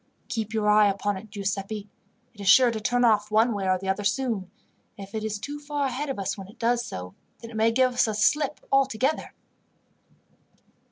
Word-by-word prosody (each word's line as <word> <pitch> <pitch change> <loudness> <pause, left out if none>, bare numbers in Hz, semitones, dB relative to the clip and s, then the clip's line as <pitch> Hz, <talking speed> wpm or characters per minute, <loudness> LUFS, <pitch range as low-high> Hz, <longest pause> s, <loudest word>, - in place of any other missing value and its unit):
"Keep 220 -3 -3
your 220 -2 0
eye 210 0 +6
upon 200 +1 -1
it, 205 +3 -9
Giuseppi. 200 +1 -4 0.5
It 210 - -12
is 200 - +1
sure 250 +3 +7
to 220 - -4
turn 245 +3 +2
off 210 -2 +3
one 220 +2 +3
way 195 -2 -2
or 185 - +3
the 190 +1 -7
other 190 +2 -1
soon, 215 -4 -1 0.5
and 195 -1 -8
if 200 - -23
it 220 -1 -3
is 215 -1 -2
too 290 +7 -6
far 290 -1 -2
ahead 275 +3 -3
of 270 - -3
us 195 -2 -2
when 195 -2 -9
it 210 - -16
does 240 +1 +1
so, 90 - -7 0.2
then 230 - -11
it - - -10
may 220 +1 +3
give 255 +1 +2
us 245 - +3
the 220 -2 -2
slip 290 +7 +1
altogether." 270 +1 +1
220 Hz, 215 wpm, -26 LUFS, 200-250 Hz, 0.5 s, sure